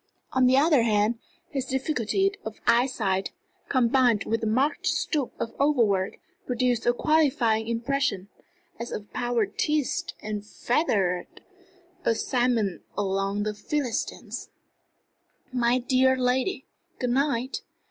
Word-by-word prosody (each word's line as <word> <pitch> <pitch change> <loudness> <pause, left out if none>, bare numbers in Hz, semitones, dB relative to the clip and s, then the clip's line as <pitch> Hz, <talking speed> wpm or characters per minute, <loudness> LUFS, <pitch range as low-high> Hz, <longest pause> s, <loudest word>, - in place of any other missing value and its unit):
On 260 -1 +4
the 260 +1 +5
other 295 -2 +5
hand, 220 0 +2 0.3
his 270 -3 -2
difficulty 265 - 0
of 220 0 -7
eyesight, 225 -6 +2 0.4
combined 245 -3 +3
with 225 +1 -1
the 220 - -1
marked 260 +7 +1
stoop 290 -6 0
of 230 - -3
overwork, 230 -10 +2 0.3
produced 245 -1 0
a 240 - +5
qualifying 240 -7 +2
impression 235 -3 -1 0.5
as 235 - -5
of 205 -1 -7
power 240 -2 +1
teased 295 +7 -1
and 210 -1 -4
fettered, 205 - -1 0.6
a 230 - +2
Samson 240 -6 0 0.2
among 195 +1 0
the 215 0 -2
Philistines. 245 +4 -3 1.0
"My 245 0 +3
dear 260 +1 +3
lady, 255 +8 0 0.3
good 250 -1 -1
night. 260 -1 0
240 Hz, 115 wpm, -26 LUFS, 215-265 Hz, 1.0 s, the